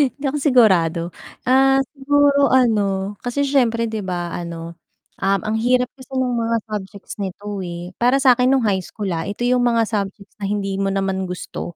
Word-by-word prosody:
hindi 285 Hz, -, -14 dB
ako 280 Hz, +2 st, 0 dB
sigurado. 190 Hz, -, +4 dB, 0.4 s
Ah, 270 Hz, +1 st, +4 dB
siguro 285 Hz, 0 st, +3 dB
ano, 205 Hz, -5 st, +2 dB
kasi 260 Hz, +3 st, -1 dB
syempre 240 Hz, -5 st, +2 dB
'di 220 Hz, -1 st, -3 dB
ba 175 Hz, -2 st, -3 dB
ano, 170 Hz, -1 st, -7 dB, 0.4 s
um, 195 Hz, 0 st, +1 dB
ang 215 Hz, +1 st, -1 dB
hirap 250 Hz, +1 st, +2 dB
kasi 265 Hz, +1 st, -10 dB
nung 250 Hz, -2 st, 0 dB
mga 230 Hz, 0 st, 0 dB
subjects 200 Hz, -1 st, -7 dB
nito, 200 Hz, +1 st, -5 dB
eh. 175 Hz, 0 st, -6 dB
Para 250 Hz, +3 st, +4 dB
sa'kin 250 Hz, -1 st, +5 dB
nung 270 Hz, -3 st, +3 dB
high 195 Hz, -3 st, +1 dB
school, 205 Hz, -3 st, -5 dB
ah. 165 Hz, +2 st, -3 dB
Ito 205 Hz, +4 st, -4 dB
yung 250 Hz, 0 st, +2 dB
mga 230 Hz, -1 st, +3 dB
subjects 200 Hz, -2 st, -4 dB
na 200 Hz, -, -3 dB
hindi 195 Hz, -1 st, -2 dB
mo 195 Hz, -, 0 dB
naman 190 Hz, -1 st, -1 dB
gusto. 180 Hz, -1 st, -6 dB
215 Hz, 180 wpm, -20 LUFS, 190-250 Hz, 0.4 s, sa'kin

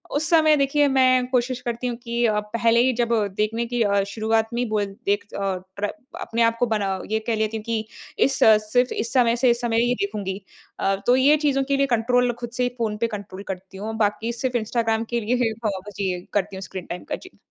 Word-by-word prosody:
उस 315 Hz, +2 st, 0 dB
समय 310 Hz, -2 st, +5 dB
देखिए 285 Hz, +1 st, +3 dB
मैं 255 Hz, -2 st, +4 dB
कोशिश 250 Hz, 0 st, 0 dB
करती 240 Hz, 0 st, -3 dB
हूँ 240 Hz, -, -2 dB
कि 235 Hz, 0 st, 0 dB
अ, 210 Hz, -2 st, +2 dB
पहले 230 Hz, +2 st, +1 dB
ही 260 Hz, 0 st, +3 dB
जब 235 Hz, 0 st, 0 dB, 0.3 s
देखने 225 Hz, +2 st, 0 dB
की 240 Hz, 0 st, -2 dB
अ, 200 Hz, -1 st, +2 dB
शुरुआत 220 Hz, +1 st, 0 dB
में 240 Hz, -, 0 dB
ही -, -, 0 dB
बोल 210 Hz, -1 st, +1 dB, 0.2 s
देख 205 Hz, +1 st, +1 dB
अ, -, -, -4 dB, 0.4 s
प्र 205 Hz, 0 st, -1 dB, 0.3 s
अपने 230 Hz, +1 st, -2 dB
आपको 230 Hz, +1 st, +2 dB
बना 195 Hz, -2 st, -1 dB
ये 220 Hz, -, +2 dB
कह 230 Hz, -, +1 dB
लेती 220 Hz, 0 st, -1 dB
हूँ 215 Hz, -, -8 dB
कि 225 Hz, -1 st, -2 dB, 0.4 s
इस 270 Hz, 0 st, 0 dB, 0.3 s
सिर्फ़ 245 Hz, 0 st, +3 dB
इस 225 Hz, +1 st, -3 dB
समय 240 Hz, -3 st, +4 dB
से 245 Hz, +1 st, +3 dB
इस 235 Hz, -, -1 dB
समय 230 Hz, -1 st, +1 dB
ये 245 Hz, -, +2 dB
देखूँगी। 200 Hz, -1 st, -4 dB, 0.4 s
अ, 195 Hz, 0 st, +1 dB
तो 250 Hz, -, +6 dB
ये 285 Hz, +4 st, +5 dB
चीज़ों 280 Hz, -2 st, +1 dB
के 275 Hz, +1 st, 0 dB
लिए 275 Hz, -, +3 dB
कंट्रोल 245 Hz, +2 st, +2 dB
ख़ुद 240 Hz, -1 st, -5 dB
से 250 Hz, -, +1 dB
ही 245 Hz, -, +1 dB
फ़ोन 220 Hz, -2 st, -1 dB
पे 230 Hz, +2 st, 0 dB
कंट्रोल 200 Hz, -2 st, -7 dB
करती 190 Hz, 0 st, -7 dB
हूँ। 220 Hz, +3 st, -4 dB
बाकी 220 Hz, +2 st, 0 dB
सिर्फ़ 245 Hz, +1 st, -1 dB
इंस्टाग्राम 225 Hz, 0 st, 0 dB
के 235 Hz, -, 0 dB
लिए 230 Hz, +4 st, 0 dB
ही 225 Hz, -, +2 dB, 0.2 s
हो 195 Hz, -3 st, -1 dB, 0.2 s
जी 190 Hz, -3 st, -1 dB
करती 200 Hz, -1 st, -1 dB
हूँ 190 Hz, -, -7 dB
स्क्रीन 185 Hz, -1 st, -7 dB
टाइम 180 Hz, -, -6 dB
का -, -, 0 dB
जी। 375 Hz, -, -14 dB
230 Hz, 235 wpm, -23 LUFS, 210-245 Hz, 0.4 s, तो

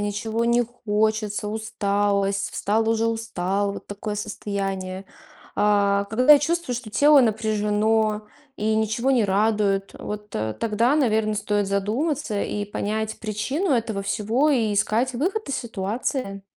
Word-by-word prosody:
ничего 215 Hz, +3 st, -2 dB
не 235 Hz, +1 st, +3 dB
хочется, 215 Hz, -2 st, -1 dB
усталость, 200 Hz, -2 st, 0 dB
встал- 220 Hz, +2 st, 0 dB
уже 225 Hz, 0 st, +2 dB
устал, 200 Hz, -3 st, -1 dB
вот -, -, -9 dB
такое 205 Hz, +1 st, -5 dB
состояние. 195 Hz, -2 st, -4 dB, 0.5 s
А, 200 Hz, -1 st, +3 dB
когда 255 Hz, +8 st, +6 dB
чувствуешь, 295 Hz, -4 st, -1 dB
что 245 Hz, -, -10 dB
тело 285 Hz, +6 st, +6 dB
напряжено 215 Hz, -1 st, +1 dB, 0.3 s
и 215 Hz, +1 st, 0 dB
ничего 220 Hz, +4 st, 0 dB
не 245 Hz, -5 st, +3 dB
радует, 200 Hz, -1 st, +1 dB
вот, 210 Hz, 0 st, -6 dB
э, 110 Hz, 0 st, -2 dB
тогда, 230 Hz, +4 st, +2 dB
наверно, 220 Hz, -7 st, +2 dB
стоит 205 Hz, -1 st, 0 dB
задуматься 215 Hz, +4 st, -1 dB
и 205 Hz, -, -3 dB
понять 215 Hz, +2 st, -3 dB
причину 260 Hz, -, -2 dB
этого 225 Hz, -5 st, -1 dB
всего 225 Hz, +8 st, +1 dB
и 230 Hz, -7 st, +2 dB
искать 225 Hz, +5 st, +1 dB
выход 370 Hz, -, -1 dB
из 275 Hz, -, -1 dB
ситуации. 215 Hz, -1 st, -3 dB
215 Hz, 130 wpm, -24 LUFS, 205-235 Hz, 0.5 s, когда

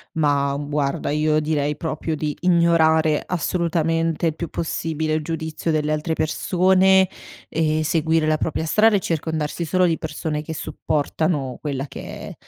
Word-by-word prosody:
Ma, 145 Hz, -3 st, +2 dB
uhm, 145 Hz, +1 st, -4 dB
guarda, 145 Hz, -1 st, -1 dB
io 155 Hz, 0 st, +2 dB
direi 150 Hz, -1 st, -1 dB
proprio 160 Hz, 0 st, -3 dB
di 150 Hz, -1 st, -2 dB
ignorare 160 Hz, -3 st, +3 dB
assolutamente 165 Hz, -2 st, 0 dB
il 160 Hz, -, -1 dB
più 170 Hz, -1 st, -5 dB
possibile 160 Hz, -1 st, -2 dB
il 155 Hz, -1 st, 0 dB
giudizio 160 Hz, 0 st, -3 dB
delle 155 Hz, -1 st, 0 dB
altre 155 Hz, +2 st, -1 dB
persone 185 Hz, +4 st, +3 dB, 0.4 s
e 155 Hz, -1 st, 0 dB
seguire 160 Hz, 0 st, +1 dB
la 155 Hz, 0 st, +2 dB
propria 160 Hz, +1 st, -2 dB
strada 210 Hz, +5 st, +4 dB
e -, -, 0 dB
circondarsi 160 Hz, -1 st, -2 dB
solo 180 Hz, +3 st, +2 dB
di 165 Hz, -2 st, +1 dB
persone 155 Hz, -1 st, -3 dB
che 160 Hz, +1 st, -6 dB
supportano 150 Hz, -3 st, -2 dB
quella 140 Hz, -2 st, -3 dB
che -, -, -9 dB
è -, -, -8 dB
160 Hz, 155 wpm, -22 LUFS, 150-165 Hz, 0.4 s, strada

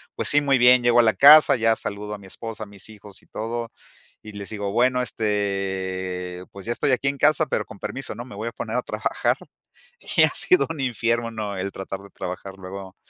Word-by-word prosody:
pues -, -, +2 dB
sí, 145 Hz, -, +6 dB
muy 140 Hz, -2 st, +2 dB
bien. 125 Hz, 0 st, +6 dB
Llego 120 Hz, 0 st, +4 dB
a -, -, +1 dB
la 110 Hz, -, +4 dB
casa, 145 Hz, -1 st, +8 dB
ya 115 Hz, -1 st, +2 dB
saludo 105 Hz, 0 st, -5 dB
a -, -, -5 dB
mi 100 Hz, -1 st, -14 dB
esposa, 110 Hz, +3 st, -7 dB
a -, -, -7 dB
mis 100 Hz, -1 st, -11 dB
hijos 105 Hz, -2 st, -12 dB
y -, -, -27 dB
todo, 115 Hz, +1 st, -5 dB, 0.5 s
y 105 Hz, -, -10 dB
les 100 Hz, -1 st, -8 dB
digo: 100 Hz, -2 st, -4 dB
"Bueno, 125 Hz, +3 st, +2 dB
este, 95 Hz, -5 st, -3 dB
pues, 100 Hz, -1 st, -11 dB
ya 115 Hz, -, -3 dB
estoy 140 Hz, +4 st, 0 dB
aquí 135 Hz, +2 st, +1 dB
en 140 Hz, -, -4 dB
casa, 155 Hz, +3 st, +3 dB
pero -, -, -2 dB
con 105 Hz, -, -12 dB
permiso, 135 Hz, +6 st, -5 dB
¿no?, 120 Hz, -, -7 dB
me 125 Hz, -3 st, -12 dB
voy 110 Hz, +3 st, -5 dB
a -, -, -3 dB
poner -, -, -4 dB
a -, -, +1 dB
trabajar", -, -, -1 dB, 0.8 s
y -, -, +7 dB
ha -, -, +5 dB
sido 365 Hz, -1 st, +4 dB
un 160 Hz, -2 st, -6 dB
infierno, 115 Hz, -2 st, -1 dB
¿no?, 105 Hz, -3 st, -5 dB
el 95 Hz, +1 st, -3 dB
tratar 95 Hz, 0 st, -6 dB
de 100 Hz, -, -14 dB
trabajar 95 Hz, +1 st, -7 dB
luego 95 Hz, 0 st, -9 dB
110 Hz, 230 wpm, -23 LUFS, 100-120 Hz, 0.8 s, casa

